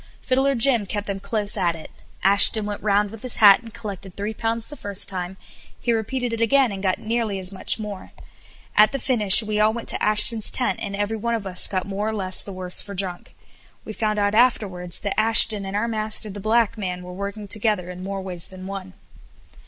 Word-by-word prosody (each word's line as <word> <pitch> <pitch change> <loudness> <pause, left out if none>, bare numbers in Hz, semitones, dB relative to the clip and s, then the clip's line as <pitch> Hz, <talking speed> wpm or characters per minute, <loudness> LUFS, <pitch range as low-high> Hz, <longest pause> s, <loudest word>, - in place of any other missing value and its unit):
Fiddler 270 +1 0
Jim 235 -4 +2
kept 205 +1 -5
them 195 -1 -5
close 205 0 -2
at 175 -4 -1
it. 160 - -12 0.3
Ashton 200 +2 +3
went 205 0 -6
round 205 0 0
with 225 -1 -12
his 255 -2 -3
hat 200 -2 +6
and 230 -1 -13
collected 200 -4 -9
three 205 +2 -5
pounds 225 +1 -3
the 295 - -11
first 205 -7 -1
time; 185 0 -6 0.4
he 235 - -1
repeated 240 +2 -3
it 230 - -4
again 260 +1 +2
and 195 -1 -7
got 185 -2 -1
nearly 225 -2 -3
as 190 0 -3
much 190 - -1
more. 210 -3 -8 0.6
At 215 +5 +4
the - - -1
finish 225 -6 +8
we 210 0 -3
all 215 +1 +3
went 235 +1 -8
to - - +2
Ashton's 215 +1 +3
tent 255 - -1
and 200 - -4
every 205 +2 -3
one 235 +2 -2
of 215 -3 -6
us 185 -1 +2
got 185 -2 -3
more 200 +2 -4
or 220 - -3
less 185 -3 +1
the 200 - -8
worse 185 -1 0
for 200 - -9
drink. 180 -2 -4 0.5
We 215 - -8
found 215 -1 -2
out 205 0 0
afterwards 200 -7 0
that 200 0 -3
Ashton 220 -2 +7
and 195 - -6
our 210 +3 -1
master, 215 -1 0
the 205 - -9
black 225 +1 0
man, 180 -2 -5
were 180 0 -10
working 200 +2 -7
together 205 -3 -2
in 180 0 -10
more 195 0 -6
ways 180 -2 -8
than 185 -1 -12
one. 190 -1 -8
205 Hz, 220 wpm, -21 LUFS, 195-225 Hz, 0.6 s, finish